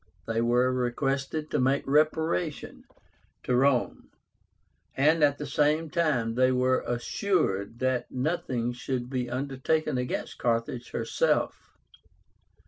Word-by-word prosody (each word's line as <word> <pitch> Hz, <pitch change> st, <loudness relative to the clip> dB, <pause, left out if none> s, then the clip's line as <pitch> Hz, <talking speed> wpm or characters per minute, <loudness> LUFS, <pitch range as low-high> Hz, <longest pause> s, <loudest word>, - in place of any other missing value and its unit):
They 115 Hz, 0 st, -1 dB
were 125 Hz, +2 st, +2 dB
requested 135 Hz, +4 st, -2 dB
to -, -, +1 dB
make 135 Hz, +2 st, +2 dB
reparation 155 Hz, +2 st, 0 dB, 0.6 s
to 125 Hz, -, 0 dB
Rome, 130 Hz, -1 st, +1 dB, 0.9 s
and 155 Hz, +3 st, +4 dB
at 145 Hz, -1 st, +4 dB
the 150 Hz, -, -5 dB
same 150 Hz, +2 st, +1 dB
time 145 Hz, -10 st, +1 dB
they 130 Hz, +2 st, +3 dB
were 130 Hz, 0 st, +2 dB
assured 120 Hz, -, -1 dB
that 130 Hz, -1 st, 0 dB
nothing 125 Hz, -4 st, -2 dB
should 125 Hz, 0 st, -4 dB
be 125 Hz, -2 st, -2 dB
undertaken 135 Hz, +2 st, -1 dB
against 125 Hz, -, -4 dB
Carthage 120 Hz, +1 st, -1 dB
herself. -, -, -1 dB
130 Hz, 115 wpm, -27 LUFS, 125-150 Hz, 0.9 s, and